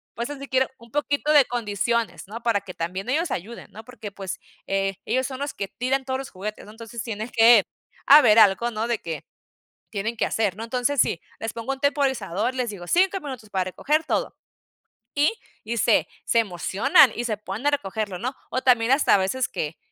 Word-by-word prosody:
pues 235 +2 -3
así 280 -1 -7
quiero 260 0 +2
un 235 -1 -17
poquito 295 +1 0
de 290 -3 +7
condiciones, 235 -1 -2
¿no?, 225 +4 -8
para 225 -4 +2
que 190 -2 -10
también 180 +5 -4
ellos 315 +3 0
ayuden, 220 +7 -6
¿no? 220 - -11
Porque, 225 -4 -9
pues, 195 -2 -6 0.3
eh, 195 0 0
ellos 260 +1 0
son 265 -1 -7
los 285 +1 -3
que 200 - -3
tiran 260 +5 -2
todos 260 0 -2
los 270 - -7
juguetes, 210 +3 -6
¿no? 210 - -12
Entonces 230 +1 -8
tiene 220 0 -5
que 225 -3 +6 0.4
haber 270 -7 +8
algo, 220 +3 +5
¿no?, 220 +1 -2
de 235 -2 -1
que 165 -2 -6 0.7
tienen 225 +3 -3
que - - +1
hacer, 205 -4 0
¿no? 225 - -5
Entonces, 250 +4 -1
sí, 165 - +1 0.2
les 225 - -3
pongo 230 +3 -4
un 270 - -6
temporizador, 260 - 0
les 250 -3 -2
digo: 185 -4 -9
"5 380 - +3
minutos 260 - -8
para 190 -2 0
recoger 300 - 0
todo". - - -2 0.8
Y 295 +8 +2 0.3
y 230 +2 -3
se - - +3 0.2
se 235 - +3
emocionan 215 +6 +4
y 240 - -3
se 215 -3 -1
ponen 210 +6 -4
a - - +4
recogerlo, 205 -7 -2
¿no? 255 +7 -3 0.2
O 255 - -1
también 245 -1 +3
hasta 275 -4 +5
a - - +5
veces 195 +7 -1
que 155 +1 -4
230 Hz, 205 wpm, -24 LUFS, 205-265 Hz, 0.8 s, haber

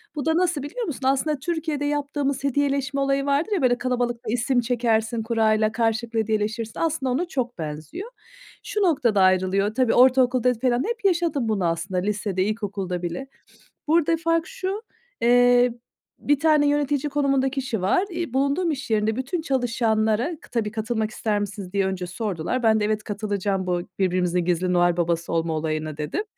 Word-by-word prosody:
Bu 290 - -3
da 320 0 +2
nasıl 350 -6 +1
biliyor 465 +12 -4
musun? 270 - -3
Aslında 275 +2 +1
Türkiye'de 315 -1 -2
yaptığımız 285 -1 -1
hediyeleşme 280 0 0
olayı 275 0 +1
vardır 285 +8 +1
ya, 395 -5 +1
böyle, 245 -2 +3
kalabalıkta 245 -2 -2
isim 245 +1 +1
çekersin 230 -1 0
kurayla, 220 -1 +2
karşılıklı 225 0 0
hediyeleşirsin, 220 +1 -2
aslında 315 -5 0
ona 290 +8 0
çok 250 -6 -3
benziyor. 155 - -6 0.5
Şu 420 - -2
noktada 250 - +2
ayrılıyor, 185 +2 +2
tabii 255 -1 +2
ortaokulda 255 -1 +4
falan 245 +1 0
hep 470 -3 -4
yaşadım 330 - +1
bunu 195 -5 0
aslında, 170 +3 -1
lisede, 200 -1 -1
ilkokulda 200 -4 -3
bile. 175 +10 -4 0.6
Burada 330 +1 +3
fark 330 +1 0
şu, 410 -3 -4 0.4
eee, 245 0 +5 0.5
bir 290 -1 +1
tane 305 -1 +4
yönetici 290 0 +1
konumunda 275 -2 +1
kişi 260 -6 -3
var. 200 - +2
Eee, 340 -7 -4
bulunduğum 280 +6 +1
iş 280 -3 -5
yerinde 215 0 +1
bütün 270 +7 -2
çalışanlara, 235 -1 0
tabii, 220 -3 -1
"Katılmak 220 0 -2
ister 215 -1 -1
misiniz?" 200 -2 -6
diye 200 -1 +2
önce 190 -1 -3
sordular. 200 +4 -3
Ben 220 -1 +4
de 210 - +1
"Evet, 215 0 -1
katılacağım 200 -3 -2
bu 175 -1 0 0.2
birbirimizin 180 -2 +1
gizli 180 +1 +1
Noel 175 -1 +3
Baba'sı 170 -1 -1
olma 165 0 0
olayına." 155 -1 -3
dedim. 150 - -2
240 Hz, 160 wpm, -24 LUFS, 205-280 Hz, 0.6 s, eee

